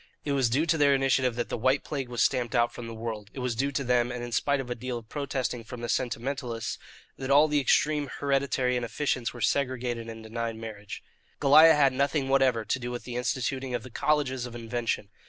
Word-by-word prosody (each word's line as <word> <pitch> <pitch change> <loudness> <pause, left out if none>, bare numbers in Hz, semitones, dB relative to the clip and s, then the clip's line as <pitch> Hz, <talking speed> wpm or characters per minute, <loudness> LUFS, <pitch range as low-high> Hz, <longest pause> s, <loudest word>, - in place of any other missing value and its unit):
It 145 - -1
was 135 -4 +2
due 140 +7 +2
to 160 -1 +1
their 140 -1 +5
initiative 130 -2 +2
that 120 -1 -3
the - - -2
white 130 +4 +2
plague 135 -4 -4
was 120 -1 +1
stamped 125 -2 0
out 120 0 +2
from 120 - -7
the 115 - -6
world. 110 -2 -5
It - - -5
was 125 -1 -1
due 135 +5 -1
to 140 - -1
them, 125 -1 +2
and 120 0 -5
in 120 - -6
spite 140 +4 +1
of 125 -2 -5
a - - +2
deal 125 +1 -4
of 115 -1 -11
protesting 135 -4 -3
from 120 +1 -9
the 120 - -4
sentimentalists, 120 -1 -2 0.4
that 135 0 -4
all 145 +3 +6
the 150 -1 +2
extreme 145 +1 +2
hereditary 135 -2 +1
inefficients 125 +1 -1
were 120 - -10
segregated 125 -4 -1
and 110 0 -8
denied 115 +1 -4
marriage. 110 -3 -8 0.4
Goliah 155 +3 +8
had 140 -3 +4
nothing 140 +1 0
whatever 130 -5 +3
to 130 - -1
do 120 0 -4
with 120 0 -5
the 125 - -7
instituting 130 +1 -2
of 120 - -4
the 130 - -11
colleges 130 -3 0
of 120 - -10
invention. 115 -3 -3
125 Hz, 225 wpm, -28 LUFS, 120-140 Hz, 0.4 s, Goliah